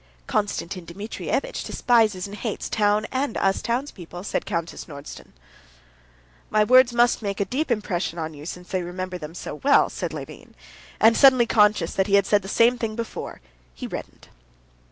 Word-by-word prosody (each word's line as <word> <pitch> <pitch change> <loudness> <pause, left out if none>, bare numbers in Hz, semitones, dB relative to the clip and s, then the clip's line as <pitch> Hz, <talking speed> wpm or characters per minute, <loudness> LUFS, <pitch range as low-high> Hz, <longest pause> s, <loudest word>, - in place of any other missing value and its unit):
"Konstantin 190 - -2
Dmitrievitch 205 - -4
despises 220 -6 +2
and 200 0 -8
hates 220 -2 -4
town 210 0 +2
and 260 -2 -1
us 195 0 +1
townspeople," 230 - -4
said - - -3
Countess 170 -4 -4
Nordston. 140 -2 -11 1.2
"My 215 - +3
words 255 +3 +6
must 240 0 +3
make 200 -2 -3
a 200 - +1
deep 275 +7 -2
impression 190 -7 -1
on 160 -1 -4
you, 150 +1 -10
since 180 +2 -8
you 185 -1 0
remember 180 +1 -5
them 155 +1 -8
so 150 - -7
well," 280 +1 +4
said - - -4
Levin, - - -9 0.4
and, 225 +1 +6
suddenly 260 -2 +6
conscious 210 -6 +3
that 190 0 +1
he 200 - +3
had 200 -1 +4
said 205 0 +3
just 195 - -7
the - - -3
same 245 +1 +3
thing 220 -2 -3
before, 230 0 -6 0.3
he - - -7
reddened. - - -8
205 Hz, 175 wpm, -24 LUFS, 180-235 Hz, 1.2 s, words